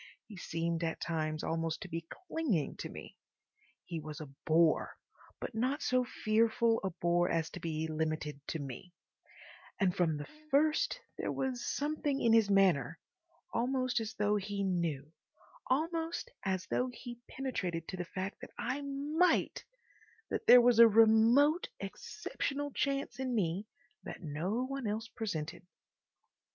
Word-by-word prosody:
He 215 - -11
seemed 165 -1 -2
at 165 -1 -2
times 155 -2 -2
almost 165 +1 -1
to - - -7
be 165 -1 -5
clinging 315 - -2
to - - -5
me. - - -10 0.7
He 170 -2 -4
was 155 -1 -7
a 155 - -6 0.2
bore, 160 0 +3 0.4
but - - -5
not 255 +6 0
so 255 0 +3
fearful 225 0 +2
a 190 - 0
bore 175 0 +1
as 165 -1 0
to 180 - -7
be 160 -2 -2
limited 155 -2 -2
to - - -2
me; 145 +5 -8 0.8
and 190 -4 +2
from 165 -4 +2
the 145 - -5 0.2
first 305 - +2 0.2
there - - -1
was 255 -2 -2
something 290 -1 -1
in 230 - +4
his 225 -3 +5
manner—almost 235 - 0
as 220 -1 -5
though 210 0 +2
he 200 0 -3
knew, 165 -6 -1 0.5
almost 330 - -1
as 190 -2 -1
though 250 - 0
he 240 -1 -9
penetrated 185 -11 -3
to - - -4
the 180 - -2
fact 190 +3 -5
that - - -8
I 275 +3 -2
MIGHT—that 325 - -2
there 245 - +10
was 240 -1 +4
a 235 - +11
remote, 225 - +5
exceptional 285 +1 -4
chance 275 0 -1
in 255 -2 -1
me 195 0 0 0.3
that - - -8
no 175 - -1
one 275 -3 -4
else 220 +2 -2
presented. 170 -10 -4
210 Hz, 145 wpm, -33 LUFS, 165-265 Hz, 0.8 s, a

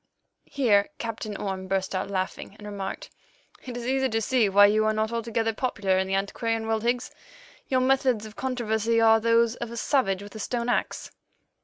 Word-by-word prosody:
Here 215 -8 +3
Captain 220 -3 -5
Orme 190 -1 -4
burst 190 0 -1
out 190 +1 -2
laughing, 190 +1 -4
and 210 - -12
remarked, 200 -2 -6 0.5
"It 245 -2 -6
is 240 - -6
easy 265 +1 +1
to 225 -1 0
see 225 -1 +2
why 205 +1 +7
you 215 +1 +3
are 215 - +2
not 215 +1 -1
altogether 230 -1 -1
popular 205 -6 0
in 190 - -1
the 190 - 0
antiquarian 225 +3 -1
world, 220 0 0
Higgs. 240 +2 -1 0.6
Your 255 -1 +2
methods 255 -4 +2
of 215 0 -11
controversy 230 -3 0
are 225 0 +6
those 230 +1 +2
of 235 - -5
a 235 - -7
savage 200 -7 +1
with 205 - -11
a 220 - -8
stone 235 +2 -2
axe." - - -2
225 Hz, 190 wpm, -26 LUFS, 205-235 Hz, 0.6 s, why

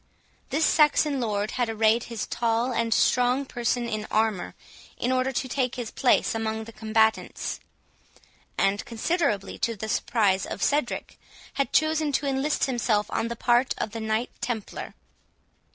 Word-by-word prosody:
This 305 +3 +2
Saxon 300 -2 +3
lord 210 -2 -1
had 245 -2 -1
arrayed 225 +1 +2
his 230 -2 -4
tall 235 +1 0
and 230 0 0
strong 250 +4 +3
person 240 -1 -1
in 215 -2 -3
armour, 215 -4 0 0.4
in 245 - -1
order 255 +1 +1
to 260 - -1
take 255 -1 -1
his 240 -3 -5
place 255 - +2
among 220 0 -2
the 225 +1 -11
combatants; 220 0 0 1.0
and, 195 +1 +1
considerably 230 - -1
to 230 - 0
the 220 +1 -5
surprise 205 -3 +1
of - - -4
Cedric, 290 -4 -1 0.3
had 275 - -1
chosen 310 -1 +2
to 280 - 0
enlist 275 +2 +1
himself 225 -5 0
on 230 - 0
the 235 - -4
part 240 +2 +2
of 215 - -3
the 225 - -5
Knight 220 +2 -1
Templar. 225 -4 -4
235 Hz, 150 wpm, -26 LUFS, 220-260 Hz, 1.0 s, Saxon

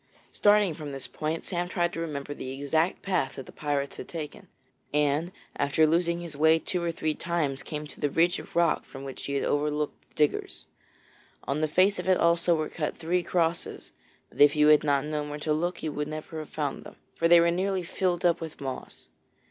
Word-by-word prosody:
Starting 205 -4 +4
from 150 -1 -7
this 135 -1 -7
point, 155 +2 -3
Sam 175 -1 -2
tried 175 -1 0
to - - -4
remember 145 -3 -4
the 130 - -7
exact 150 +6 0
path 180 -9 0
that 135 - -7
the - - -12
pirates 145 -2 -2
had - - -7
taken, 155 -3 -7 0.4
and 150 +3 +1 0.3
after 140 +3 +3
losing 170 +2 +1
his 170 -4 -8
way 160 +2 +5
two 180 +2 -3
or 170 -1 0
three 155 -1 -1
times 155 -5 -2
came 150 -1 -5
to 150 - -13
the 145 - +1
ridge 170 +5 +2
of - - -12
rock 170 -2 +3
from 135 0 -10
which 135 -1 -7
he 140 - -2
had 140 - 0
overlooked 150 +1 -1
the - - -32
diggers. 150 -1 0 0.8
On 140 +3 -2
the 155 - +2
face 185 +5 +3
of 180 - -2
it 185 - +5
also 170 0 +3
were 155 -1 -1
cut 150 -3 -3
three 175 +2 0
crosses, 170 -1 -1 0.4
but - - -4
if 145 0 +7
you 150 0 +5
had 150 -1 +6
not 140 -1 +2
known 150 -1 -3
where 145 - -4
to 150 +1 0
look 170 +3 -2
you 155 - -1
would 150 0 -3
never 155 +1 -6
have 155 - -7
found 145 -3 -3
them, - - -12 0.2
for 165 - +1
they 170 0 +8
were 170 0 +4
nearly 190 +1 0
filled 180 0 -1
up 170 -1 +3
with 160 -2 -7
moss. 135 -2 -7
155 Hz, 220 wpm, -28 LUFS, 145-170 Hz, 0.8 s, they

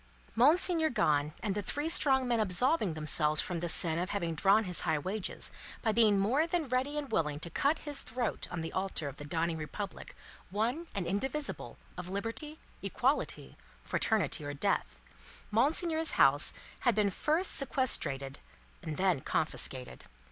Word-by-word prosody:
Monseigneur 320 +6 +4
gone, 150 - +1
and 205 -3 -1
the 205 - -2
three 290 +9 -3
strong 265 -5 +4
men 235 -2 +1
absolving 215 - +1
themselves 155 0 +2
from 175 -2 -1
the 175 +1 -3
sin 165 -1 +3
of 180 +2 -2
having 170 -5 -2
drawn 195 +7 +3
his 180 -4 -2
high 160 - 0
wages, 190 +6 -3 0.3
by 225 - +2
being 215 -2 +4
more 250 +11 +2
than 335 -3 -1
ready 260 +4 -1
and 285 -4 -4
willing 150 -7 0
to 170 +1 -7
cut 285 - +1
his 290 -2 0
throat 235 -1 -3
on 175 -2 -4
the 160 - -6
altar 185 -5 -1
of 140 - -8
the - - -8
dawning 165 +2 -2
Republic 180 +5 -7 0.3
one 235 - -2
and 195 -3 -2
indivisible 265 - -3 0.2
of 180 0 -6
Liberty, 230 +10 -5 0.2
Equality, 250 +8 -1 0.3
Fraternity, 215 -8 0
or 145 0 -5
Death, 140 - -1 0.5
Monseigneur's 315 +7 +2
house 140 +2 +6 0.3
had 245 -3 +2
been 210 -2 +2
first 315 - +1
sequestrated, 145 - 0 0.4
and 155 -3 -5
then 185 -7 +1
confiscated. 130 -4 -2
205 Hz, 160 wpm, -31 LUFS, 165-265 Hz, 0.5 s, house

